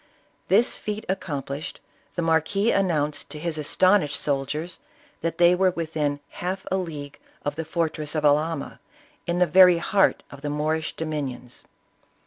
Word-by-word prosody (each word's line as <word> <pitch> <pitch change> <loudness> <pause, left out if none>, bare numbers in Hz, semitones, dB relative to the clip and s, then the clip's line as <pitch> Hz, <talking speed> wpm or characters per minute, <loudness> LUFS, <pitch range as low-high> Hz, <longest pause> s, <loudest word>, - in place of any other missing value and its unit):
This 215 +6 +3
feat 210 0 -4
accomplished, 150 -4 -4 0.4
the 175 - -1
marquis 165 +7 +2
announced 155 -6 0
to 155 - -7
his 155 0 -3
as 150 - -2
tonished 185 -6 +4
soldiers 150 +5 -2 0.4
that 165 0 -2
they 175 0 +6
were 185 +1 +3
within 155 -4 -2
half 185 +2 -4
a 190 - +2
league 150 -6 -6 0.3
of 145 0 -1
the 160 +1 -4
fortress 155 -2 -2
of 150 -1 0
Alhama, 150 +1 +1 0.5
in 170 0 0
the 180 - +5
very 180 +1 +7
heart 195 +3 +2
of 140 - -11
the 145 - -3
Moorish 155 +2 -1
dominions. 140 -6 -5
160 Hz, 150 wpm, -25 LUFS, 150-180 Hz, 0.5 s, very